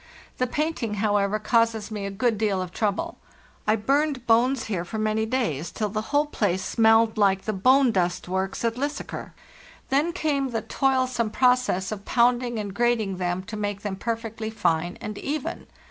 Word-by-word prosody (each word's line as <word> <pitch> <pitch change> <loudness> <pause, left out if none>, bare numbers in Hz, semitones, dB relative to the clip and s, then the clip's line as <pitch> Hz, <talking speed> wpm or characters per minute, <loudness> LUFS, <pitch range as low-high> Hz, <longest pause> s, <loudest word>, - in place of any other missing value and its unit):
The 255 - +2
painting, 280 -6 -2
however, 205 0 +1
causes 225 0 +1
me 205 -2 -3
a - - -3
good 225 +4 0
deal 205 -3 +1
of 185 -1 -4
trouble. 205 +1 -2 0.5
I 215 - +4
burned 275 +3 0
bones 240 +2 +3
here 190 -6 -2
for 220 +5 -6
many 215 +1 0
days 175 - -1
till 210 +4 -2
the 215 +1 -2
whole 290 +1 +3
place 190 -10 -1
smelled 225 0 +4
like 195 -2 +3
the 215 - -2
bone 255 +6 +4
dust 180 -4 0
works 190 +4 -2
at 230 +1 0
Lysaker; 285 +1 -4 0.6
then 290 +5 +2
came 285 -5 0
the 225 -3 -2
toilsome 255 -2 +1
process 250 -5 +2
of 205 -2 -5
pounding 240 0 +2
and 205 -2 -4
grating 225 -4 +1
them 180 0 -2
to 215 - -7
make 205 -1 -3
them 205 -2 -3
perfectly 225 +1 -4
fine 175 -5 0
and 210 -1 -5
even. 290 0 -4
220 Hz, 175 wpm, -25 LUFS, 200-250 Hz, 0.6 s, I